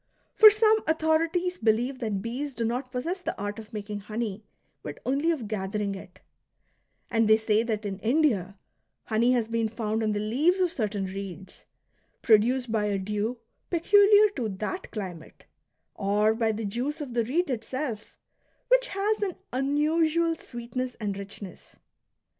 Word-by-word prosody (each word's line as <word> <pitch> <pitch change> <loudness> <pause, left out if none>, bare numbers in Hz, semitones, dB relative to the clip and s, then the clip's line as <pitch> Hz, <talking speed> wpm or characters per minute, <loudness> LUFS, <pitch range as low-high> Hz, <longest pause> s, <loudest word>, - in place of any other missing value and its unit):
For 435 - +10
some 430 +1 +4
authorities 325 +3 +1
believe 235 +4 +1
that 210 -5 -2
bees 265 +4 -4
do 230 0 -1
not 250 +3 -2
possess 330 +9 -3
the - - -4
art 205 +1 -4
of 215 -1 -11
making 210 -1 -5
honey, 215 0 -4 0.4
but - - -7
only 280 +6 +1
of 285 -10 -1
gathering 205 0 -2
it; 190 - -11 0.9
and 225 -1 +3
they 220 0 +6
say 220 -1 +2
that 220 -2 -2
in 195 -1 -4
India 220 - +1 0.5
honey 230 +3 +2
has 235 -3 +1
been 230 -1 0
found 220 0 -2
on 215 -1 +1
the 205 - -1
leaves 280 - +2
of 360 -2 +2
certain 210 -6 -2
reeds, 190 -1 -8 0.6
produced 235 +2 +3
by 215 -2 +1
a 205 -1 0
dew 210 +5 -2 0.3
peculiar 410 +4 +6
to 250 - -3
that 210 - -5
climate, 185 -6 -8 0.5
or 210 +2 +2
by 225 -1 +1
the 220 0 -4
juice 250 +10 -3
of 280 -5 -6
the 235 -1 +1
reed 320 +6 0
itself, 245 -1 -4 0.5
which - - +4
has 415 +1 -1
an 385 -4 -1 0.2
unusual 315 +5 +2
sweetness 245 -2 -5
and 205 -3 -2
richness. 200 -1 -10
230 Hz, 155 wpm, -27 LUFS, 210-305 Hz, 0.9 s, For